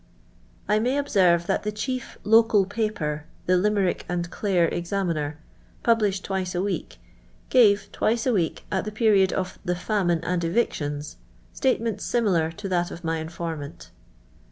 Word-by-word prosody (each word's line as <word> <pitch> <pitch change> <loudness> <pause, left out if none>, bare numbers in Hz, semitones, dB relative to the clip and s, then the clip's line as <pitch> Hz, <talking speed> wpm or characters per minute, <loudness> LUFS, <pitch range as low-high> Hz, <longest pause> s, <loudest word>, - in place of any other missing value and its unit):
I 210 +1 +3
may 250 +5 +1
observe 180 -11 +3
that - - 0
the 210 - -2
chief 255 +4 -4
local 225 -2 +5
paper, 185 -8 -2 0.2
the 180 - +2
Tjihie.rirk 195 0 +1
ami 175 -1 -1
Clare 175 0 +1
Exaniiiier. 170 -4 -2 0.5
published 210 -5 +2
twice 190 -2 -2
a 175 - +1
week, 200 - -3 0.5
gave, 210 -5 +5
twice 230 +1 0
a 255 - +2
week, 170 -6 -1
at 190 - 0
the 215 - -4
period 210 -4 +3
of 185 -1 -3
" - - -30
the 180 -2 -1
famine 175 -3 0
and 175 0 -1
evictions," 150 -6 -1 0.4
statements 230 -5 0
similar 185 -9 +1
to 205 +4 -7
that 175 -2 0
of 175 - -9
my 165 0 -1
informant. 160 -2 -6
190 Hz, 155 wpm, -25 LUFS, 170-215 Hz, 0.5 s, local